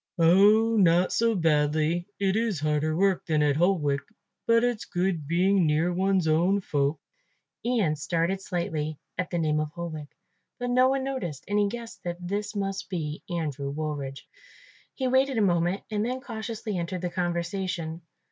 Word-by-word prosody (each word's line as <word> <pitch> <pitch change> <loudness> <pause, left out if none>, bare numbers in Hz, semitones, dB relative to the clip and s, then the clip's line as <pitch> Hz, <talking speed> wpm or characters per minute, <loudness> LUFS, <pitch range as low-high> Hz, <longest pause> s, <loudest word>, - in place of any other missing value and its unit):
"Oh, 205 +7 +5
not 180 -2 +4
so 230 -1 +2
badly; 155 0 +1
it 195 -1 +1
is 220 -6 0
harder 155 +1 +1
work 195 -1 +2
than 155 -2 +2
at 145 -1 +2
Holwick, 155 -4 +2 0.5
but 230 0 +4
it's 245 -3 0
good 175 -5 -1
being 180 +2 +3
near 160 +4 +2
one's 190 -1 +1
own 175 +6 +3
folk." 145 -4 0 0.6
Ian 225 -11 +1
started 170 +5 -1
slightly 155 -5 -3 0.2
at 185 - -1
the 175 - -2
name 155 -2 +1
of 155 0 -1
Holwick, 160 -4 -6 0.5
but 245 0 -2
no 255 +1 +5
one 270 0 0
noticed 205 - -4
and 205 0 +1
he 205 - +3
guessed 230 +2 -7
that 175 -1 -3
this 200 +4 -3
must 195 -1 -3
be 155 -5 -4
Andrew 150 -5 -3
Woolridge. 145 -2 -4 0.7
He 260 - -1
waited 260 0 +2
a - - +3
moment 175 0 +1
and 210 -1 0
then 250 +3 -2
cautiously 220 -4 -5
entered 170 +1 -3
the 180 -1 -3
conversation. 175 -1 -2
175 Hz, 165 wpm, -27 LUFS, 155-205 Hz, 0.7 s, Oh